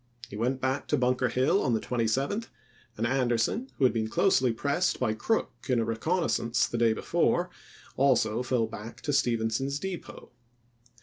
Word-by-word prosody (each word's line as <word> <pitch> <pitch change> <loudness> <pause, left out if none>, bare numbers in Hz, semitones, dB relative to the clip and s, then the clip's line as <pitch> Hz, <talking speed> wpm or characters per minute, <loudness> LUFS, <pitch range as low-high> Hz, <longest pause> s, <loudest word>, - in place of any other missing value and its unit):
He - - -7
went 125 +5 -1
back 130 +2 -1
to - - +1
Bunker 125 0 +1
Hill 130 +3 +2
on 125 - +1
the - - 0
27th, 135 - -1 0.5
and 115 - -1
Anderson, 125 - 0
who - - -1
had 130 - +5
been 110 -1 -1
closely 130 - +3
Aug.,i86*. 115 - -8
pressed 145 +7 0
by 120 -4 +1
Crook 220 - 0 0.2
in 125 -2 +3
a 115 - 0
reconnaissance 115 0 0
the 120 - -3
day 115 -1 +4
be - - -7
fore, - - +1 0.5
also 125 -4 +2
fell 125 -2 +1
back 110 +1 -9
to 145 - -2
Stephenson's 120 +2 0
Depot. 185 +1 -7
125 Hz, 175 wpm, -28 LUFS, 115-140 Hz, 0.5 s, had